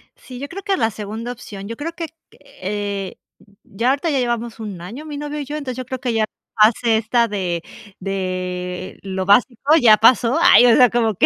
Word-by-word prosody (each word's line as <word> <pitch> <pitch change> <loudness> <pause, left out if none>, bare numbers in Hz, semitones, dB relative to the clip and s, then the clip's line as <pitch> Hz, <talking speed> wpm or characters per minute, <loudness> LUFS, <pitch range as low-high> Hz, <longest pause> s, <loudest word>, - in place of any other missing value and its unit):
Sí, 250 -1 -11
yo 280 - -5
creo 390 +7 -8
que 395 -2 0
la 225 - +1
segunda 220 +4 -6
opción, 200 -4 -9
yo 230 - -5
creo 305 +7 -5
que, 330 -1 -5 0.2
eh, 200 0 -5 0.5
ya 230 +6 -1
ahorita 285 +5 0
ya 280 -3 +1
llevamos 235 -2 -2
1 205 -5 -6
año, 235 - -8
mi 300 -2 -6
novio 295 +1 -5
y 290 - -4
yo, 290 +3 -6
entonces, 260 -4 -5
yo 255 - -5
creo 260 0 -5
que 250 -2 -2
ya 220 -1 +2 0.3
hace 220 +1 +4
esta 230 +2 +1
de 180 -5 -3 0.4
de 185 -1 -4
lo 190 -1 -4
básico, 240 +8 +3
ya 215 -3 +7
pasó. 235 +4 +4
Ay, 345 -8 +7
o 235 - +6
sea, 250 -1 +6
como 225 -3 +1
que - - +3
230 Hz, 210 wpm, -20 LUFS, 200-260 Hz, 0.5 s, ya